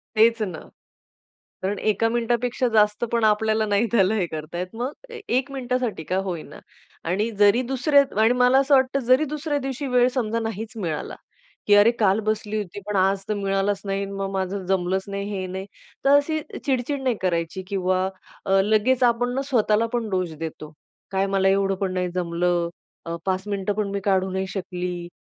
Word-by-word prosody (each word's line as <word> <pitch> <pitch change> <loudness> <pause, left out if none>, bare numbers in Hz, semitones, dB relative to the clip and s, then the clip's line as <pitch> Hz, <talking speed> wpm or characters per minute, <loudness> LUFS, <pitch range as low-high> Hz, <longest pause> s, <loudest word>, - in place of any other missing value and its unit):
तेच 230 +1 +4
ना. 180 -7 -3 1.0
कारण 195 +2 -1
1का 215 +1 +1
मिनिटापेक्षा 240 +2 0
जास्त 210 0 +3
पण 235 -1 +2
आपल्याला 215 0 +2
नाही 205 +2 +2
त्याला 205 -2 +3
हे 195 -5 0
करतायेत. 165 +3 -5
मग 250 +4 -2 0.2
ए 465 -1 -8 0.2
1 270 +2 0
मिनिटासाठी 250 -7 -2
का 185 - -2
होईना 175 -5 -6 0.5
आणि 205 +6 0
जरी 205 +4 +5
दुसऱ्या 280 +2 +4 0.2
आणि 225 +2 +5
मला 250 +1 +4
असं 275 +1 +4
वाटतं 265 0 +3
जरी 255 +5 +5
दुसऱ्या 300 0 -2
दिवशी 270 +1 -4
वेळ 250 -1 +4
समजा 230 -3 0
नाहीचं 225 0 -5
मिळाला 165 -5 -3 0.5
की 205 - +6
अरे, 205 +3 +7
काल 215 -3 +2
बसली 215 0 -2
होती. 205 -1 -5
पण 210 -1 -2
आज 195 +1 +2
तर 215 - 0
मिळालचं 195 0 -1
नाही. 195 0 -1
मग 195 0 -4
माझं 190 0 -2
जमलंच 190 0 0
नाही 200 0 -3
हे 190 -2 -3
नाही. 190 +1 -6 0.4
तर 275 - +4
अशी 310 +2 +1 0.3
चिडचिड 270 +1 0
नाही 255 -3 +1
करायची 170 0 -1
किंवा 185 -1 0 0.4
अ, 195 0 +4
लगेचं 220 +5 +3
आपण 245 +1 +1
ना 270 - 0
स्वतःला 230 -4 +2
पण 235 -2 -1
दोष 185 -3 -1
देतो. 155 -1 -7 0.4
काय 195 0 +1
मला 195 -1 +2
एवढं 195 0 +2
पण 190 -2 -1
नाही 180 -1 0
जमलं. 175 -1 0 0.4
अ, 165 0 -3
5 190 0 0
मिनिटं 200 0 -1
पण 210 -1 -1
मी 200 0 -2
काढू 190 -1 +2
नाही 190 +1 -2
शकली. 180 -2 -4
205 Hz, 180 wpm, -24 LUFS, 190-240 Hz, 1.0 s, अरे